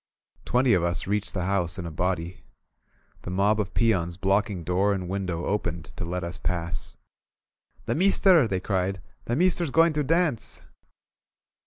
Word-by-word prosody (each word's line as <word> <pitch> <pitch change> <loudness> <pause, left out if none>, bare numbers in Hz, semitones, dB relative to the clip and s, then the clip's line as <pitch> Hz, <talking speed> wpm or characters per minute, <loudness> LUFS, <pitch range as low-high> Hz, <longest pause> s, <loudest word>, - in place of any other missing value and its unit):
Twenty 125 0 +3
of 90 - +3
us 85 0 -1
reached 105 +1 -2
the 90 -2 -1
house 90 -2 -1
in 90 - -5
a 85 - -5
body. 90 +1 -2 0.8
The - - -7
mob 100 +4 +2
of 100 -2 -3
peons 90 -7 +1
blocking 100 -1 0
door 95 +4 +1
and 95 -2 -4
window 90 -3 -3
opened 85 -5 -3
to - - -5
let 90 +1 -3
us 85 +1 -6
pass. 85 -2 -4 0.9
"The - - 0
meester!" 185 - +5
they 95 -3 -1
cried. 95 0 -1 0.3
"The 120 - -1
meester's 175 0 +2
going 165 +3 +4
to 150 0 0
dance!" 160 -4 0
95 Hz, 160 wpm, -26 LUFS, 90-115 Hz, 0.9 s, meester